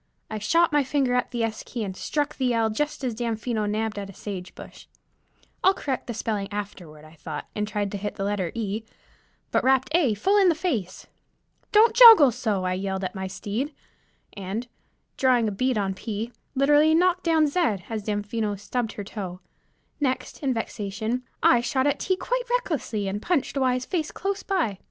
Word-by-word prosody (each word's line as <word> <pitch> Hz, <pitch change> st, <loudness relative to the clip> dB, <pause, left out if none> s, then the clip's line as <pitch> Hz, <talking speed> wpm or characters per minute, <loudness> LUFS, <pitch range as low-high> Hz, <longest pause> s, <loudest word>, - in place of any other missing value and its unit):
I 215 Hz, -, -3 dB
shot 330 Hz, +12 st, +3 dB
my 295 Hz, -1 st, +3 dB
finger 265 Hz, -1 st, 0 dB
at 250 Hz, -, +1 dB
the 240 Hz, -2 st, -2 dB
S 225 Hz, -1 st, -2 dB
key 235 Hz, -3 st, -5 dB
and 190 Hz, -2 st, -5 dB
struck 295 Hz, +8 st, -2 dB
the 250 Hz, -3 st, +1 dB
L 225 Hz, -1 st, +2 dB
just 295 Hz, +5 st, -2 dB
as 250 Hz, -3 st, -1 dB
Damfino 225 Hz, -1 st, -2 dB
nabbed 215 Hz, 0 st, -2 dB
at 200 Hz, -1 st, -6 dB
a -, -, -10 dB
sage 185 Hz, -3 st, -7 dB
bush. -, -, -12 dB, 0.8 s
I'll 380 Hz, +1 st, +5 dB
correct 270 Hz, -8 st, -3 dB
the 235 Hz, -, -4 dB
spelling 210 Hz, -3 st, -2 dB
afterward 180 Hz, -7 st, -7 dB
I 155 Hz, -, -15 dB
thought, 155 Hz, -1 st, -7 dB
and 210 Hz, 0 st, -1 dB
tried 205 Hz, -1 st, -2 dB
to 200 Hz, -, -4 dB
hit 205 Hz, +1 st, -4 dB
the 195 Hz, -, -3 dB
letter 195 Hz, -4 st, -1 dB
E, 215 Hz, -1 st, -2 dB, 0.7 s
but -, -, +2 dB
rapped 260 Hz, 0 st, +3 dB
A 275 Hz, -11 st, +3 dB
full 390 Hz, -, +2 dB
in 380 Hz, -, +5 dB
the 335 Hz, -, +2 dB
face. 255 Hz, -, -3 dB, 0.7 s
"Don't 435 Hz, +2 st, +5 dB
joggle 450 Hz, -, +10 dB
so!" 215 Hz, -6 st, -1 dB
I 185 Hz, 0 st, 0 dB
yelled 190 Hz, +1 st, -3 dB
at 185 Hz, -, -3 dB
my 190 Hz, -1 st, -4 dB
steed, 215 Hz, +9 st, -4 dB, 0.6 s
and, 200 Hz, +5 st, -5 dB, 0.5 s
drawing 250 Hz, -4 st, +3 dB
a -, -, -1 dB
bead 255 Hz, +4 st, 0 dB
on 195 Hz, -2 st, 0 dB
P, 220 Hz, +4 st, -5 dB, 0.2 s
literally 295 Hz, +3 st, +5 dB
knocked 360 Hz, +1 st, +3 dB
down 320 Hz, -2 st, +3 dB
Z, 300 Hz, +5 st, 0 dB, 0.3 s
as 220 Hz, -2 st, -3 dB
Damfino 205 Hz, +1 st, -2 dB
stubbed 225 Hz, +2 st, -3 dB
her 205 Hz, -, -6 dB
toe. 190 Hz, -3 st, -6 dB, 0.6 s
Next, 260 Hz, -3 st, -2 dB
in 275 Hz, -3 st, +1 dB
vexation, 220 Hz, 0 st, -3 dB, 0.2 s
I 240 Hz, -, +6 dB
shot 260 Hz, +2 st, 0 dB
at 290 Hz, -1 st, +1 dB
T 375 Hz, -, +1 dB
quite -, -, -2 dB
recklessly, 305 Hz, -, -1 dB
and 200 Hz, +2 st, -3 dB
punched 330 Hz, -2 st, 0 dB
Y's 255 Hz, -2 st, +1 dB
face 330 Hz, -5 st, -2 dB
close 395 Hz, +1 st, -3 dB
by. 320 Hz, -, -1 dB
230 Hz, 190 wpm, -25 LUFS, 205-290 Hz, 0.8 s, joggle